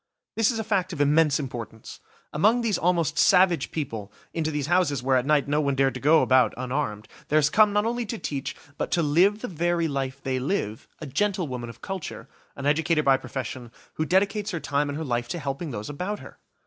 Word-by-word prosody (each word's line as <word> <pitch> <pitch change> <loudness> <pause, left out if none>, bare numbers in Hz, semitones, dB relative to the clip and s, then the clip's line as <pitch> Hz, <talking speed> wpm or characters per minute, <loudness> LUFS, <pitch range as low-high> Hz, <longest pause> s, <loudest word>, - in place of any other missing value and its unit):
This 225 -1 +3
is 235 - -1
a 220 - -2
fact 195 -4 0
of 160 - -7
immense 150 +1 +3
importance. 115 -5 -7 0.3
Among 215 +10 +3
these 225 -4 0
almost 170 -1 +1
savage 180 -2 +4
people, 115 -10 -5 0.2
into 160 -2 -1
these 150 -3 -2
houses 160 -6 +1
where 130 0 +2
at 130 +1 +1
night 150 -2 +3
no 150 +1 +1
one 140 -2 0
dared 135 0 +2
to 125 - -6
go 155 +4 +5
about 130 -1 +3
unarmed, 125 -4 -3 0.2
there 155 - +2
has 150 -1 +3
come 215 -1 +5
not 210 +1 +1
only 235 0 -2
to 230 - -4
teach, 140 -8 -4 0.2
but - - -1
to 170 - +2
live 185 +8 +3
the - - -2
very 170 -1 0
life 135 -2 -3
they 130 -1 -2
live, 125 - -2
a 155 - -8
gentlewoman 145 - -2
of 115 - -12
culture, 190 -4 -6 0.3
an 140 - -6
educator 155 +1 +2
by 135 -1 +5
profession, 130 -2 -6 0.2
who 155 - -2
dedicates 195 +4 +1
her 175 - -3
time 145 -1 -1
and 145 - -4
her 160 - -4
life 120 -2 -1
to 125 - -4
helping 145 +3 -4
those 105 -5 -5
about 180 +8 -4
her! - - -13
150 Hz, 215 wpm, -25 LUFS, 135-180 Hz, 0.3 s, go